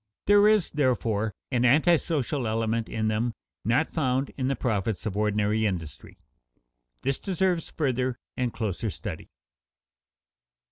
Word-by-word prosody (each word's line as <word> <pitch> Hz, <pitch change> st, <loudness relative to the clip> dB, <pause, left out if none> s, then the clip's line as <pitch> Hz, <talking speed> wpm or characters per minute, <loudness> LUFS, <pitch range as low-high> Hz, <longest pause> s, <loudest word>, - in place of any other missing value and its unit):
There 205 Hz, +1 st, +6 dB
is, 215 Hz, -5 st, +3 dB
therefore, 115 Hz, -7 st, 0 dB, 0.2 s
an 125 Hz, -2 st, +2 dB
antisocial 145 Hz, -1 st, +2 dB
element 115 Hz, 0 st, -1 dB
in 110 Hz, -1 st, -1 dB
them 110 Hz, +1 st, 0 dB, 0.3 s
not 125 Hz, +8 st, +1 dB
found 135 Hz, -3 st, 0 dB
in 130 Hz, -2 st, -1 dB
the 135 Hz, -, +1 dB
profits 110 Hz, -4 st, -1 dB
of 105 Hz, -3 st, -2 dB
ordinary 105 Hz, +1 st, +1 dB
industry. 85 Hz, -6 st, -6 dB, 0.9 s
This 135 Hz, +1 st, 0 dB
deserves 185 Hz, -3 st, 0 dB
further 130 Hz, -4 st, -1 dB, 0.2 s
and 125 Hz, -2 st, -1 dB
closer 110 Hz, -2 st, -2 dB
study. -, -, -7 dB
120 Hz, 125 wpm, -27 LUFS, 110-145 Hz, 0.9 s, There